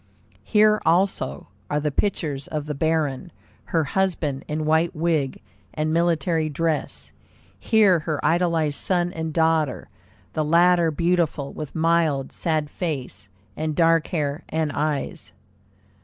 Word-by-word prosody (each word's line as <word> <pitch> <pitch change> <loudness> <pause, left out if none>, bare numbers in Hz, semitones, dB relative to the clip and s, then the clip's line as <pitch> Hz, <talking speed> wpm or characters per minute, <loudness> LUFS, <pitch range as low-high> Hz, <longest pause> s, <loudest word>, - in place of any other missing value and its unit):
Here 215 0 +4
also 170 - 0 0.2
are 150 - 0
the 150 0 -1
pictures 145 -6 -2
of 150 -2 -4
the 150 - -3
Baron, 160 +1 -1 0.3
her 165 -2 +1
husband, 150 -4 -1
in 155 +1 -2
white 160 +2 +2
wig 155 -4 0 0.4
and 155 +1 -1
military 165 -1 +1
dress; 160 +1 -2 0.5
here 210 -6 +4
her 155 -1 -3
idolized 165 -4 +1
son 175 -1 0
and 160 0 -4
daughter, 160 -3 +1 0.4
the 155 - 0
latter 170 +2 +4
beautiful, 165 -3 0
with 150 -2 -7
mild, 160 -4 +1
sad 155 -3 -1
face, 145 - -5 0.3
and 155 0 -2
dark 165 -1 +3
hair 150 -3 -2
and 160 -1 -1
eyes. 145 -8 -3
160 Hz, 125 wpm, -23 LUFS, 150-170 Hz, 0.5 s, Here